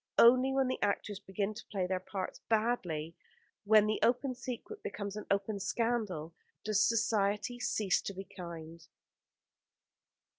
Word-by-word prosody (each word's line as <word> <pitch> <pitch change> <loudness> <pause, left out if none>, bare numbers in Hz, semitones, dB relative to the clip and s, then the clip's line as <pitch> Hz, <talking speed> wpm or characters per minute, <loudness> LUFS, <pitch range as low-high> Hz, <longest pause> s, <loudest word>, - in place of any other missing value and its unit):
Only 255 +3 +7
when 265 -1 +2
the 255 - -2
actors 205 0 -1
begin 200 +1 -2
to 225 - -10
play 190 -3 -1
their 185 0 -1
parts 185 0 -5
badly, 190 -9 0 0.5
and - - -17
when 215 -1 +7
the 215 0 0
open 255 +2 +2
secret 255 - -7
becomes 200 -1 -5
an 210 - -6
open 200 +1 0
scandal, 210 -8 -1 0.3
does 210 -1 +3
Society 215 +1 +1
cease 205 -6 +1
to 200 - -5
be 195 - -5
kind. 165 -3 -9
210 Hz, 145 wpm, -33 LUFS, 190-235 Hz, 0.5 s, Only